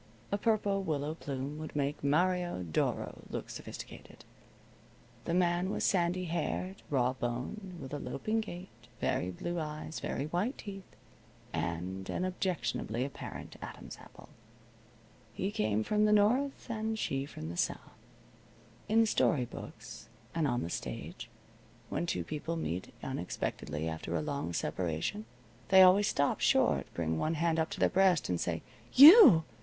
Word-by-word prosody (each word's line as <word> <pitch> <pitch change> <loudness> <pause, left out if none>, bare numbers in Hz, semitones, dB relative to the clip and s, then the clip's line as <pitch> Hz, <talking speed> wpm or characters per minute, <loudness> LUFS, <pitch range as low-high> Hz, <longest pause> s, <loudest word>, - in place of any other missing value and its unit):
A 200 - +1
purple 205 -3 +1
willow 150 -4 -2
plume 140 -1 -5
would 155 -1 -7
make 145 0 -1
Mario 175 - +1
Doro 80 -3 -2
look - - -5
sophisticated. - - -10 1.0
The 170 - 0
man 175 0 +2
was - - -2
sandy 180 0 +1
haired, 175 +3 -3
raw 130 -3 +2
boned, 130 - -4
with 135 0 -8
a 145 - -2
loping 215 +13 -2
gait, 185 -3 -8 0.3
very 90 - 0
blue 175 - -4
eyes, 155 0 -5
very 140 - -3
white 180 - -1
teeth, 195 -2 -9 0.6
and 95 +3 -3
an 185 - -1
objectionably 135 - -2
apparent 140 - -8
Adam's - - -9
apple. - - -15 1.0
He 195 +9 -2
came 110 - 0
from 210 - +2
the 210 - +3
north, 240 +7 +2
and 220 -1 -2
she 135 -8 -2
from 80 - -7
the 85 - -6
south. - - 0 1.1
In 225 +1 +5
story 155 - +2
books, 115 -1 -10 0.2
and 165 -3 +1
on 120 -2 0
the 85 - -4
stage, - - -6 0.6
when 175 - -2
two - - -1
people 155 +2 -4
meet 95 - -3
unexpectedly 80 +2 -3
after 80 +1 -4
a 80 - 0
long 140 - -3
separation 85 - -2 0.4
they 190 0 +9
always 195 +2 +6
stop 140 0 +1
short, - - +2
bring 80 -1 -1
one 160 - 0
hand 165 0 +1
up 160 - +1
to - - -6
their - - +5
breast, 185 - +3
and 90 -1 0
say: 85 -2 -2 0.3
"You!" 295 - +10
160 Hz, 150 wpm, -32 LUFS, 120-190 Hz, 1.1 s, You